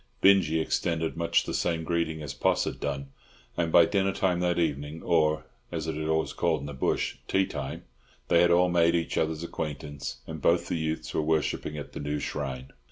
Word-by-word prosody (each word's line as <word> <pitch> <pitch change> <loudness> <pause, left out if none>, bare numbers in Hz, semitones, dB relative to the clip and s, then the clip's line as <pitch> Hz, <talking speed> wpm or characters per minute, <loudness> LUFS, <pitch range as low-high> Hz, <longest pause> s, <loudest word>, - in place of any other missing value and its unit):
Binjie 95 -5 +5
extended 80 0 -1
much 85 0 +2
the - - -5
same 80 -2 0
greeting 80 -2 -1
as 70 -2 -5
Poss 65 - +2
had - - -4
done; 70 -1 -3 0.4
and 85 -2 0
by 85 0 +7
dinner 95 +1 +1
time 90 -2 +1
that 90 -1 +1
evening—or, 80 0 +1 0.3
as - - -3
it - - -2
is 80 +1 -3
always 80 0 +1
called 85 -2 +1
in - - -6
the 75 - -6
bush, 65 - -1
tea 95 0 +2
time—they 70 +3 -3
had 85 - +5
all 90 +1 +5
made 85 -1 +4
each 85 -1 -1
other's 80 0 0
acquaintance, 75 -4 -5
and 80 -2 -7
both 85 +4 +2
the - - 0
youths 80 0 -3
were - - +1
worshipping 75 -1 0
at 75 - -7
the - - -6
new 75 +1 -2
shrine. 65 -3 -4
80 Hz, 195 wpm, -28 LUFS, 75-85 Hz, 0.4 s, by